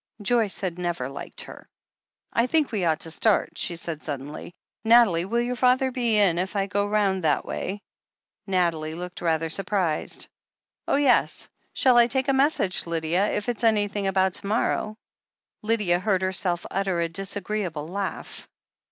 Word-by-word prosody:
Joyce 220 -2 +1
had 180 -2 -3
never 175 -8 -2
liked 140 - -7
her. - - -11 0.7
"I 235 +2 +2
think 310 -1 +1
we 200 -6 -1
ought 160 -2 +1
to 165 - -2
start," 215 +5 +1
she 175 - -1
said 165 -2 -4
suddenly. 145 +2 -6 0.3
"Nathalie, 225 -7 +5
will 235 +5 0
your 245 +1 -2
father 255 +1 +3
be 240 -4 +1
in 185 -5 +3
if 190 +3 -3
I 195 -1 +1
go 200 +1 -1
round 200 -3 +1
that 150 -2 +1
way?" 200 +2 -4 0.7
Nathalie 170 -4 0
looked 180 +1 -7
rather 165 -1 +1
surprised. 180 -1 -2 0.6
"Oh, - - +2
yes. 280 -3 +2 0.2
Shall 255 -2 +4
I 235 0 +7
take 265 +3 0
a - - +4
message, 265 - +1
Lydia, 170 +4 0
if 210 - -2
it's 240 -1 -3
any 215 -2 +3
thing 200 -1 -3
about 190 -1 +2
to 195 - -3
morrow 215 0 0 0.3
?" - - -67
Lydia 210 -5 +1
heard 190 -1 +1
herself 180 -2 0
utter 190 -2 0
a 170 - +1
disagreeable 190 -3 -3
laugh. 195 +2 -5
195 Hz, 170 wpm, -25 LUFS, 175-220 Hz, 0.7 s, I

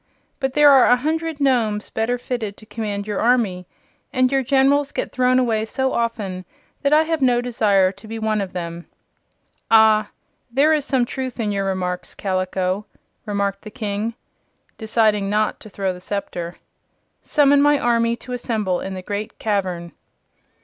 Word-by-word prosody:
But 265 -2 -1
there 295 0 +7
are 270 -2 +6
a 245 - +6
hundred 315 +3 -2
Nomes 230 -7 +1
better 230 +3 0
fitted 240 -5 -4
to 215 - -15
command 210 -2 -4
your 210 -2 -3
army, 215 -7 +1 0.4
and 255 -1 +2
your 270 -1 +2
Generals 275 +2 +2
get - - -3
thrown 255 0 +2
away 230 -4 +1
so 265 +4 -1
often 210 -6 -2 0.4
that 280 - +1
I 305 +1 +6
have 320 -1 -2
no 250 -2 +3
desire 210 -6 +2
to 200 +3 -15
be 225 +1 -5
one 220 -1 0
of 190 -2 -4
them." 170 -1 -6 0.8
"Ah, 220 -1 +5 0.4
there 280 +6 +3
is 300 -3 0
some 265 -4 +1
truth 260 0 -5
in 215 -2 0
your 200 -1 -1
remarks, 180 -2 -3
Kaliko," 185 +1 -2 0.4
remarked 200 -1 -1
the 215 - -9
King, 215 0 -3 0.6
deciding 215 -3 +1
not 210 +1 0
to 215 - -12
throw 190 -1 -2
the 180 - -11
scepter. 175 -3 -4 0.7
"Summon 285 -2 +4
my 290 0 +4
army 235 -2 +1
to 250 +1 -9
assemble 215 -7 -1
in 190 0 -5
the 185 - -7
Great 205 +2 -5
Cavern." 185 -5 -2
220 Hz, 165 wpm, -21 LUFS, 200-255 Hz, 0.8 s, there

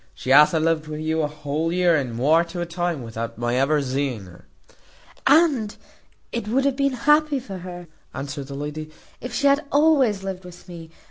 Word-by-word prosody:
She 130 - -4
hath 150 +2 +7
a - - +3
lived 160 -1 0
wi' 155 0 -5
you 160 +1 -1
a 150 - 0
whole 150 +2 -3
year 175 -1 +3
and 130 -6 -2
muore 155 +7 +4
to 170 +1 -7
a 175 - -1
time, 175 -4 -3
without 115 0 -6
my 120 0 -1
ever 140 +3 +2
zeeing 130 -5 -2
her." 90 -1 -16 0.8
"And 280 -9 +3 0.5
it 235 -3 -4
would 265 +5 +1
have 280 -2 +1
been 275 -1 +1
happy 300 -1 +4
for 200 -7 -8
her," 175 0 -8 0.3
answered 140 0 -6
the 140 - -7
lady, 150 +2 -5 0.3
"if 250 - -7
she 245 +4 -2
had 280 +2 +4
always 280 -9 +3
lived 190 -1 -5
with 180 0 -13
me. 170 -2 -10
165 Hz, 200 wpm, -23 LUFS, 145-220 Hz, 0.8 s, hath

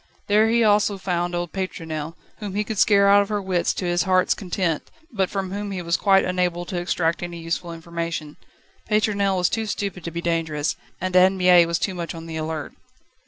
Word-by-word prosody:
There 215 +2 +4
he 235 0 +3
also 205 -1 +3
found 175 -2 -2
old 175 -1 -3
Pétronelle, 165 -4 -4 0.2
whom 205 -3 -6
he 210 - +1
could 215 -1 -4
scare 200 -2 +5
out 200 0 +7
of 200 - -3
her 210 -1 0
wits 185 -3 0
to 185 - -3
his 175 0 +1
heart's 185 -1 +3
content, 180 -4 -2 0.2
but 195 -4 0
from 195 -2 -3
whom 205 +1 -4
he 185 -3 -4
was 170 0 +1
quite 195 -1 +4
unable 180 -1 -1
to 175 0 -3
extract 170 -1 0
any 175 -1 -5
useful 165 +1 -3
information. 165 -2 -5 0.5
Pétronelle 205 -2 +1
was 180 -1 +3
too 220 -1 -2
stupid 200 -4 -4
to - - -4
be 170 +1 -5
dangerous, 165 -3 -1 0.2
and 185 0 -3
Anne 185 +1 +5
Mie 180 -2 +6
was 170 0 0
too 190 - -2
much 170 -1 -5
on 165 0 -8
the 165 -1 -7
alert. 155 0 -4
180 Hz, 210 wpm, -23 LUFS, 170-200 Hz, 0.5 s, out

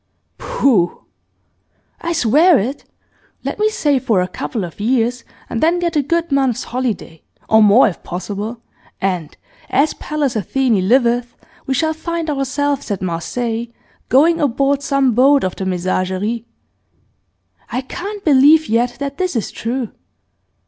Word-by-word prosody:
'Pooh!' 265 - +1 1.0
'I 340 0 -2
swear 310 +4 +4
it! 255 +6 -3 0.6
Let - - -4
me 430 0 +3
save 290 -10 0
for 220 -7 +2
a 180 - 0
couple 205 +3 -4
of 175 +1 -8
years, 240 +2 0 0.2
and 230 - -3
then 335 +3 +3
get 345 -2 -1
a 295 - +3
good 335 +3 -1
month's 270 -4 +1
holiday, 230 -10 -4 0.3
or 220 0 +5
more 215 +4 +6
if 190 - -5
possible, 205 +6 -5 0.4
and, 180 -5 -2 0.3
as 290 +3 +2
Pallas 295 -5 -2
Athene 220 -1 +1
liveth! 240 -1 +2 0.3
we 265 - 0
shall 315 +4 +1
find 330 0 -3
ourselves 280 0 -1
at 195 -3 -3
Marseilles, 225 +7 -3 0.4
going 330 +5 +4
aboard 275 +1 +1
some 275 -3 +1
boat 270 +4 +4
of 185 - -2
the 190 - -4
Messageries. 185 +5 -1 1.2
I 245 +2 -2
can't 395 +9 -7
believe 300 +2 +5
yet 240 +2 +1
that 280 +2 -5
this 365 -5 -1
is 225 - -2
true. 240 0 -3
255 Hz, 140 wpm, -18 LUFS, 220-290 Hz, 1.2 s, more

